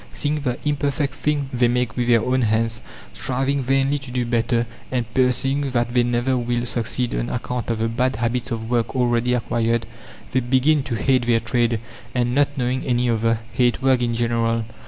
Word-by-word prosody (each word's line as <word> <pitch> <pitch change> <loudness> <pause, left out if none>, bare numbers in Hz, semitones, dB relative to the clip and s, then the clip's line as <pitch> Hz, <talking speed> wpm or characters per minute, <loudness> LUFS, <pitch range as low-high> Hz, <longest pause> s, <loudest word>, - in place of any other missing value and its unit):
Seeing 150 +1 -1
the 125 -3 -1
imperfect 145 -1 0
thing 145 -2 -1
they 120 -1 +3
make 125 -1 0
with 120 -1 -1
their 115 -2 +4
own 130 +1 +1
hands, 110 0 0 0.3
striving 135 +2 -1
vainly 135 +2 +1
to 140 -2 -10
do 125 0 -1
better, 120 0 +1 0.3
and 125 -2 0
perceiving 135 +2 +2
that 120 -1 0
they 125 - +4
never 120 +2 +1
will 120 0 -1
succeed 120 +1 -1
on - - -2
account 120 -1 -3
of 115 - 0
the 110 +1 0
bad 125 +2 0
habits 120 +3 -1
of 115 -2 -4
work 120 +1 0
already 125 -1 +2
acquired, 115 -1 0 0.5
they 130 - +2
begin 130 +4 +2
to 130 -3 -3
hate 125 +2 +1
their 115 -1 +4
trade, 115 0 0 0.4
and, 120 -1 +1
not 140 +1 +4
knowing 130 0 -1
any 125 -1 +1
other, 115 0 +1
hate 125 0 +1
work 130 -2 +3
in 120 -1 0
general. 115 -1 0
120 Hz, 190 wpm, -22 LUFS, 115-130 Hz, 0.5 s, their